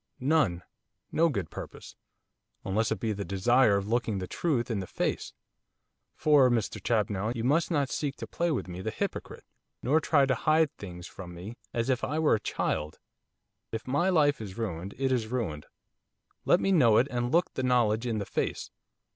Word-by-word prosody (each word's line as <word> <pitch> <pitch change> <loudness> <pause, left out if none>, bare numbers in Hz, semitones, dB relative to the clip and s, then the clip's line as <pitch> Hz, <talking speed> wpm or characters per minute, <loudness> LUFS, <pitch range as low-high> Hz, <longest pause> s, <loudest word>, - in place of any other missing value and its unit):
'None, 130 - +2 0.5
no 165 +1 +3
good 100 - -3
purpose, - - -9 0.7
unless 110 +4 0
it - - -1
be 115 -3 -1
the 100 0 -4
desire 105 +4 +3
of 100 0 -3
looking 115 -2 0
the 95 - -3
truth 125 - -1
in 110 - -1
the 95 - -5
face. - - -2 0.8
For, 145 -4 +5
Mr 115 -3 -1
Champnell, 110 -1 0
you 115 - -3
must 150 +7 +2
not 145 -6 0
seek 145 -2 -2
to - - -7
play 170 0 -1
with 145 - -1
me 90 0 -6
the - - -2
hypocrite, - - -5 0.4
nor 145 +6 +3
try 145 -3 +4
to 135 - +2
hide 155 +4 +2
things 90 -3 -8
from 90 -1 -9
me 95 +7 -8 0.2
as 115 -1 -1
if 130 -2 0
I 150 - -1
were 160 -1 +3
a 110 - +2
child. 75 -5 -2 0.7
If 110 0 -4
my 145 +8 +1
life 145 -7 +3
is 100 -3 -7
ruined 100 -4 -4
it 135 0 0
is 120 -4 0
ruined, 110 -12 -3 0.8
let 175 - +5
me 195 - +1
know 120 - +5
it, 130 - +4
and 120 0 -1
look 175 +2 +2
the - - -2
knowledge 120 -2 +2
in 115 -2 -1
the 100 - -2
face. - - -3
120 Hz, 190 wpm, -29 LUFS, 100-140 Hz, 0.8 s, For